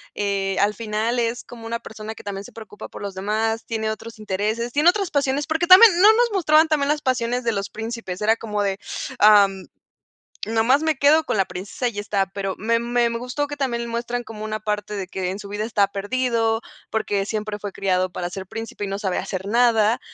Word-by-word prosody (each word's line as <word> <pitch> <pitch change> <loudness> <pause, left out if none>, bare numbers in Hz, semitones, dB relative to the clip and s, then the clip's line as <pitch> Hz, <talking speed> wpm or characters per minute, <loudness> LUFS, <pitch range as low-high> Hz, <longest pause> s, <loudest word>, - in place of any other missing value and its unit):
eh, 195 -1 -1
al 205 +1 +3
final 225 +2 -2
es 235 +1 -1
como 230 -2 -10
una 230 +1 -2
persona 220 -1 -8
que - - -12
también 200 0 -5
se 250 - -12
preocupa 215 -2 -10
por - - -9
los 200 -1 -5
demás. 220 +4 -1
Tiene 220 -1 -2
otros 225 +1 -8
intereses, 215 +3 -2
tiene 300 +4 +5
otras 390 -1 0
pasiones 285 -1 0
porque 320 +3 0
también, 380 +5 +10
no 420 +3 +9
nos 475 +1 +2
mostraban 320 -5 +4
también 295 -3 +1
las 300 0 +1
pasiones 250 -1 0
de 235 - +1
los 200 -2 -3
príncipes. 225 -4 -6
Era 220 +2 +3
como 210 -2 -2
de: 195 -1 -1 0.4
"Am, 200 -2 +5 0.8
nomás 225 +6 +2
me 315 -1 +1
quedo 295 +4 +5
con - - -1
la 195 - +3
princesa 195 +7 -5
y - - -6
ya 205 - -4
está", 200 -1 0
pero 195 0 -4
me 230 +3 +1
me 240 0 +1
me 230 - -3
gustó 250 +4 -3
que 290 - -6
también 240 -4 -2
muestran 240 +1 -3
como 215 -2 -8
una 215 0 -3
parte 210 0 -3
de 195 -2 -4
que: 185 -1 -3
"En 190 - -5
su 200 - -9
vida 205 +1 -4
está 210 -3 +2
perdido, 225 +2 0 0.3
porque 205 -3 -1
siempre 215 -1 -3
fue 205 - -5
criado 185 -1 0
para 175 0 -4
ser 190 +1 -7
Príncipe 225 -1 -7
y - - -3
no 195 0 -3
sabe 190 -4 -1
hacer 190 0 -4
nada". 230 +1 +3
225 Hz, 220 wpm, -22 LUFS, 205-245 Hz, 0.8 s, también